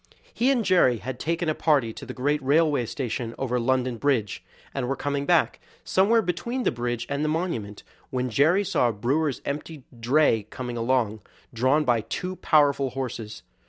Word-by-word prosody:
He 250 - +2
and 245 -5 +2
Jerry 175 -10 +4
had 125 +3 -6
taken 170 +2 -1
a 155 - +2
party 140 -8 +1
to - - -10
the - - -6
great 145 +3 0
railway 145 -2 +2
station 120 -2 -4
over 125 -2 -1
London 125 0 0
Bridge, 120 -7 0 0.3
and 130 -3 -2
were 135 - -1
coming 140 0 -2
back, 175 -2 +2 0.2
somewhere 220 +4 +3
between 235 +9 -2
the - - +2
bridge 120 -1 -3
and 140 +1 -2
the 155 - 0
monument, 150 - -3 0.3
when 125 -1 -2
Jerry 160 - +3
saw 125 -10 +1
a - - -2
brewer's 135 +7 -1
empty 145 0 -5 0.2
dray 120 -3 +2
coming 125 -2 -6
along, 115 -3 0 0.3
drawn 130 +6 +2
by 120 -3 +2
two 180 - -4
powerful 140 -3 +3
horses. 120 -4 -6
135 Hz, 175 wpm, -25 LUFS, 120-155 Hz, 0.3 s, Jerry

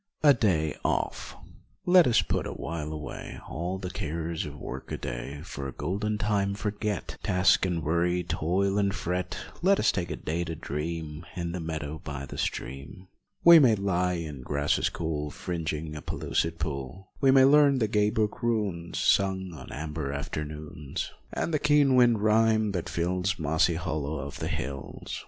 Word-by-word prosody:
50 - - +5
A - - +9
DAY 85 - +1
OFF - - -1 0.5
Let 180 -3 +7
us 115 -2 +4
put - - -1
awhile 75 +1 -4
away 75 -1 -7
All 90 +4 -3
the 90 -1 -5
cares 80 -2 -3
of 75 0 -8
work 65 -1 -7
a - - -2
day, - - -5
For 70 -6 -6
a - - -5
golden 105 +3 -2
time 100 -2 0
forget, 105 -2 -3
Task 90 +1 +3
and 85 -3 -2
worry, 85 +3 +1
toil 95 +6 0
and 100 -1 +1
fret, 90 +1 -2 0.2
Let 195 +3 +4
us - - +4
take 90 -2 -3
a 80 - -2
day 80 +4 -2
to 80 -1 -4
dream 75 +1 -4
In 85 -1 -3
the 90 - -4
meadow 80 -2 -4
by 70 -2 -5
the - - -8
stream. 70 +9 -4 0.3
We 170 -1 +10
may 125 -7 +6
lie 90 -3 +1
in 80 -6 -5
grasses 70 +3 +1
cool 75 -3 -3
Fringing 80 -2 -4
a 75 - -6
pellucid 80 +5 -1
pool, 75 +3 -5
We 135 - +5
may 130 0 +7
learn 140 0 +6
the 110 -4 +2
gay 105 0 +2
brook 105 0 -1
runes 105 -8 -1
Sung 95 -2 +2
on 80 - -10
amber 75 -1 -4
afternoons, 75 0 -5 0.2
And 165 - -2
the 150 - +2
keen 145 -2 +4
wind 120 -4 +5
rhyme 110 0 +3
that 90 -4 -3
fills 90 +2 0
Mossy 80 +2 +2
hollows 80 -4 -3
of - - -9
the - - -2
hills. 70 +1 -5
85 Hz, 175 wpm, -28 LUFS, 75-105 Hz, 0.5 s, We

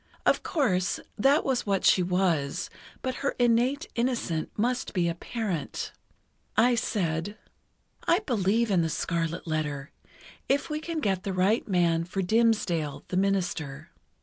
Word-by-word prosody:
Of - - +3
course, 200 - 0 0.2
that 275 +8 +4
was 260 -5 0
what 195 -2 +1
she 185 - +6
was, 175 -6 0 0.3
but 255 -1 -2
her 280 - 0
innate 245 +5 +2
innocence 235 -10 -1
must 245 +2 -1
be 175 -2 +2
apparent. 175 0 -3 0.7
I 245 +1 +5
said: 200 -4 -1 0.7
"I 340 - +5
believe 230 - +1
in 180 -3 +4
'The 165 - 0
Scarlet 165 0 -2
Letter,' 150 -3 -2 0.6
if 280 +3 +1
we 305 - -1
can 325 0 -3
get 190 -5 0
the 195 0 -3
right 190 +5 +2
man 170 -4 +2
for 190 +2 -2
Dimmesdale, 180 -8 +1
the 180 - -1
minister." 175 -7 -1
195 Hz, 140 wpm, -27 LUFS, 170-240 Hz, 0.7 s, she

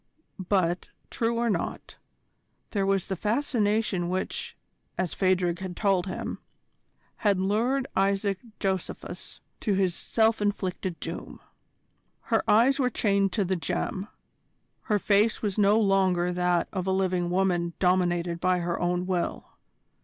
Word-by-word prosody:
But, 180 -3 +1 0.2
true 230 0 0
or 235 0 +1
not, 215 - -3 0.7
there 195 -2 0
was 195 -2 +1
the 190 - -3
fascination 210 - 0
which, 185 +1 -3 0.4
as 185 -2 -1
Phadrig 180 -2 +1
had 185 -2 -6
told 195 -3 +2
him, 185 - -4 0.8
had 205 -4 +2
lured 230 +8 +1
Isaac 195 0 +1 0.2
Josephus 190 -2 -4 0.2
to 205 -4 0
his 190 -2 +2
self 220 +4 +1
inflicted 190 -3 -2
doom. - - -6 0.8
Her - - +1
eyes 245 +6 +5
were 255 -2 +3
chained 200 -4 +1
to 205 -4 +1
the 190 +1 0
gem: 185 +3 -3 0.8
her 210 -4 +2
face 205 +3 +2
was 205 -1 -1
no 205 +2 +5
longer 190 -4 +2
that 180 -1 +1
of 185 -2 -2
a - - +2
living 185 -2 +1
woman 175 -2 +1
dominated 175 -2 +1
by 185 +1 +2
her 175 -1 -2
own 180 0 0
will. 180 -2 -2
190 Hz, 135 wpm, -27 LUFS, 180-205 Hz, 0.8 s, eyes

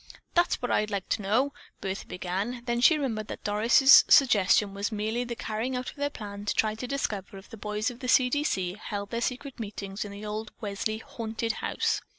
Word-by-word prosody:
"That's 345 0 +2
what 245 - -1
I'd 210 - +2
like 200 -3 -3
to - - 0
know!" 245 +8 +1 0.3
Bertha 190 +1 -4
began, 195 +7 -3
then 240 -1 0
she 315 +6 +7
remembered 225 -7 -2
that - - -7
Doris' 230 +7 +7
suggestion 205 -5 +5
was 200 +2 -2
merely 220 +3 -1
the 240 -1 -5
carrying 225 +4 -3
out 250 0 -3
of - - -20
their 285 0 -1
plan 205 -6 -8
to - - -1
try 215 -1 +2
to 225 +3 -6
discover 205 -8 -3
if 195 - -14
the - - -7
boys 210 +1 -2
of 240 - -12
the 255 - -5
"C. 250 0 +5
D. 290 +4 0
C." 185 -11 -1
held 200 -1 -5
their 235 0 -2
secret 255 +2 -3
meetings 200 -2 -5
in 205 - -8
the 200 +1 -8
old 215 +1 -5
Welsley 215 0 -2
"haunted" 225 0 -3
house. - - -1
220 Hz, 215 wpm, -28 LUFS, 205-245 Hz, 0.3 s, she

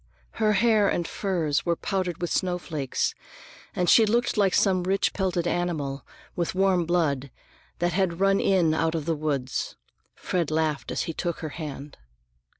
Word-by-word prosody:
Her 215 -1 +4
hair 215 0 +4
and 170 -2 -1
furs 170 -7 -1
were 170 -1 +1
powdered 185 -1 -2
with 175 - -2
snowflakes, 175 -7 -1 0.6
and 180 - 0
she 225 - +7
looked 235 +3 +1
like 200 -4 +3
some 190 -3 +3
rich 190 +2 +1
pelted 180 -3 -1
animal, 155 -6 -2 0.3
with 175 +1 -2
warm 190 -2 +2
blood, 145 -6 0 0.5
that 175 0 0
had 180 -2 0
run 195 0 +3
in 180 -5 +3
out 160 +1 0
of 155 -3 -3
the 165 - +1
woods. 145 -4 -2 0.4
Fred 175 -4 -2
laughed 155 -2 -1
as - - -1
he 165 - -4
took 170 +1 -3
her 155 - -4
hand. 145 -2 -8
175 Hz, 160 wpm, -26 LUFS, 155-190 Hz, 0.6 s, she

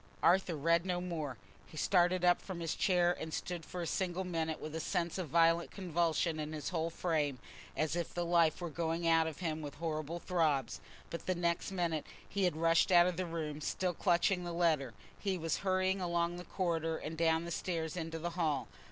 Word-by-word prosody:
_ - - -30 0.2
Arthur 180 -1 +4
read 165 +3 +3
no 180 -1 -1
more. 160 -8 -4 0.3
He 155 - -12
started 180 +1 +3
up 175 0 +4
from 185 -3 -6
his 165 -1 -1
chair 180 -2 +3
and 160 - -5
stood 175 +1 -4
for 180 +1 -5
a - - -2
single 185 +1 -1
minute 165 -3 -2
with 155 - -6
a 160 - -2
sense 170 +2 -1
of 175 -5 -3
violent 165 +2 +4
convulsion 170 -3 0
in 155 0 -4
his 150 -2 -3
whole 165 -2 -1
frame, 155 -5 0 0.4
as 155 +1 0
if 175 -1 -2
the 175 0 -2
life 170 -1 +3
were 170 -2 -3
going 165 +1 -1
out 165 -1 +4
of 160 +2 -6
him 160 -2 -2
with 145 -2 -6
horrible 160 0 -3
throbs; 160 -6 0 0.3
but 170 - -6
the 185 - +1
next 170 +1 0
minute 170 -5 -1 0.2
he 200 -2 0
had 175 -4 +1
rushed 165 +2 +3
out 175 -1 +8
of 180 -1 0
the 185 +1 -2
room, 155 -3 -4
still 180 +3 -1
clutching 180 +1 +2
the 175 -1 -4
letter—he 170 - -1
was 165 -2 -1
hurrying 185 0 +1
along 170 0 0
the 180 - -8
corridor, 165 -3 -1
and 160 - -5
down 165 0 +2
the 170 - -5
stairs 165 -2 -2
into 165 -2 -4
the 170 +2 -3
hall. 160 -5 0
170 Hz, 210 wpm, -34 LUFS, 160-175 Hz, 0.4 s, out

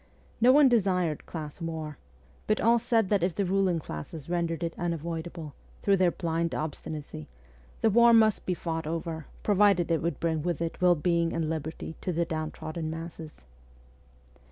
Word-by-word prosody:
No 245 +2 +7
one 290 +1 +7
desired 185 - +1
class 155 0 -7
war, 160 -3 -5 0.5
but 215 - +2
all 235 +1 +4
said 225 -4 +1
that 205 -3 +2
if 175 -1 0
the 200 - 0
ruling 190 -1 +2
classes 150 - -7
rendered 170 -1 -1
it 165 0 -2
unavoidable, 165 -2 -4 0.3
through 200 -1 +4
their 185 -1 +4
blind 170 -1 -2
obstinacy, 150 - -5 0.5
the 225 - +4
war 235 +2 +6
must 220 -3 +4
be 180 - +1
fought 165 -2 -3
over, 160 -1 -4 0.2
provided 200 -4 +3
it 165 - +2
would 165 -4 -2
bring 160 -2 0
with 175 0 -2
it 165 +1 -4
well 180 -1 +5
being 170 +1 +1
and 160 -1 -1
liberty 160 0 -5
to 185 - -2
the 170 0 0
downtrodden 155 0 -4
masses. 160 - -8
170 Hz, 165 wpm, -28 LUFS, 160-185 Hz, 0.5 s, No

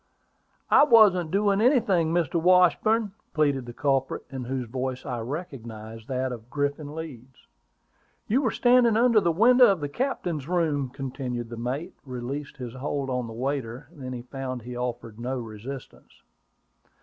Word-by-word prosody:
"I - - +8
wasn't 210 - +6
doing 200 +2 +2
anything, 210 - +3
Mr. 170 -1 +1
Washburn," 185 +5 +4 0.2
pleaded 140 -5 +1
the 120 - -7
culprit, 135 +1 0
in 130 -2 -5
whose 130 0 -3
voice 130 +2 -4
I 125 -4 -3
recognized 115 -5 -7
that 130 0 -1
of 120 -1 -8
Griffin 145 +1 -2
Leeds. 135 -6 -9 0.8
"You 250 +6 +2
were 250 - +2
standing 245 -2 +4
under 230 -2 +5
the 170 - +2
open 165 +2 -2
window 245 +2 +7
of 195 -4 +2
the 145 -1 -3
captain's 175 - -2
room!" 155 -6 0
continued 130 -3 -5
the 115 - -6
mate, 135 +10 -4
releasing 135 +3 -6
his 125 -4 -6
hold 135 0 -3
on 125 -2 -2
the 115 - -8
waiter 130 +1 -3
when 135 -6 -8
he 120 -1 -6
found 130 -1 -5
he 125 +1 -7
offered 120 -2 -5
no 130 +2 -3
resistance. 115 +3 -9
135 Hz, 160 wpm, -26 LUFS, 125-175 Hz, 0.8 s, I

